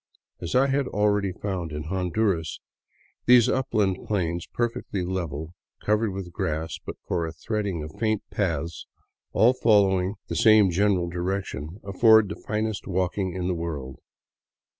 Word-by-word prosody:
As 85 +4 -4
I 130 +2 +5
had 140 -1 +1
already 105 -2 +1
found 90 -3 -4
in 75 0 -4
Honduras, 90 0 -1 0.7
these 120 -2 +7
upland 105 -7 0
plains, 85 -4 -1
perfectly 115 -5 -2
level, 85 -3 -4 0.3
cov 105 0 +2
ered 110 -2 -1
with 95 -2 -6
grass 80 0 -3
but - - -6
for 85 -2 -1
a - - -5
threading 100 -1 -3
of 75 - -7
faint 110 -2 0
paths 85 -5 -2 0.4
all 120 +3 +5
following 100 -5 +3
the - - -4
same 110 -4 +6
general 95 -1 +2
direction, 90 -2 -4
afford 110 +1 +5
the 105 - -4
finest 110 -1 -3
walking 95 0 -1
in 90 -1 -2
the 90 - +1
world. 75 -6 -5
95 Hz, 145 wpm, -25 LUFS, 85-105 Hz, 0.7 s, these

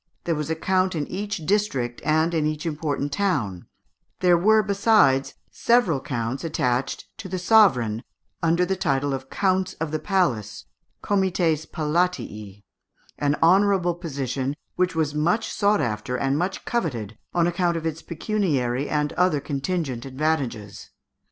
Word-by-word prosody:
There 170 - 0
was 150 -1 -3
a 160 - 0
count 185 +2 +1
in 150 -2 -1
each 200 -3 -4
district 140 - 0
and 160 +2 +2
in 155 -2 +1
each 155 +1 -3
important 150 -2 -2
town; 130 - -1 0.5
there 180 -1 +5
were, 215 +5 +4
besides, 200 -10 +3 0.2
several 230 - +2
counts 120 0 -3
attached 130 -6 -1
to 200 -4 -7
the 185 - -2
sovereign, 170 - +4 0.4
under 170 +2 +2
the 190 +2 -1
title 145 -6 0
of 135 0 -5
counts 190 -1 0
of 160 -1 -4
the 155 - -1
palace 120 - -1 0.4
(comites 175 -6 +1
palatii), 150 - -2 0.6
an 145 0 +1
honourable 190 0 +4
position, 140 -5 -3 0.2
which 180 -1 0
was 155 -3 0
much 175 +9 0
sought 205 -3 +2
after 120 0 -2
and 135 +1 0
much 180 +5 -2
coveted 120 - -2 0.2
on 170 -1 +3
account 175 0 +1
of 165 - -5
its 160 0 -3
pecuniary 150 - -1
and 150 -1 0
other 180 -5 +2
contingent 140 -3 -3
advantages. 130 -7 -2
160 Hz, 145 wpm, -24 LUFS, 135-185 Hz, 0.6 s, there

